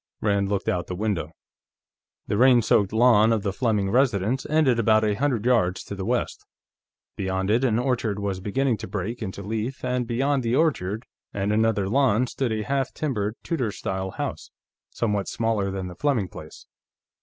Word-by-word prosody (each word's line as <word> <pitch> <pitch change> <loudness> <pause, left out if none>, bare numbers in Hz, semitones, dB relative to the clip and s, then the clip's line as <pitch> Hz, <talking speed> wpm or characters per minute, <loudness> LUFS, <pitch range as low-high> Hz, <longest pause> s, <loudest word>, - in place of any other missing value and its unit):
Rand 100 -2 +1
looked 100 -1 -2
out 90 -1 -1
the 90 - -4
window. 95 -6 -2 1.0
The - - -1
rain 125 +1 +5
soaked 100 -2 +3
lawn 115 -1 +5
of 110 -3 +1
the 100 -2 -1
Fleming 105 -5 0
residence 120 -1 +1
ended 150 -6 +3
about 110 -1 +4
a 105 -1 +2
hundred 120 -1 -1
yards 110 -8 +2
to - - -7
the 95 -1 -5
west; - - -1 0.7
beyond 95 +1 -1
it, 120 +4 +2
an 115 -4 +2
orchard 120 -5 0
was 100 -2 -2
beginning 120 +5 0
to 110 +1 -7
break 105 +5 -4
into 100 -1 -5
leaf, 110 +6 -4
and 125 -1 -1
beyond 135 +4 +1
the 120 0 0
orchard 115 - 0 0.3
and 100 +1 0
another 110 -3 +2
lawn 125 0 +3
stood 125 0 -2
a 110 -1 -1
half 135 +3 -1
timbered 110 -8 -2
Tudor 130 -11 -1
style 95 -1 -4
house, - - -5 0.4
somewhat 105 -4 -1
smaller 110 -3 0
than 95 -1 -4
the 90 - -7
Fleming 120 -4 0
place. - - -11
110 Hz, 180 wpm, -25 LUFS, 100-125 Hz, 1.0 s, rain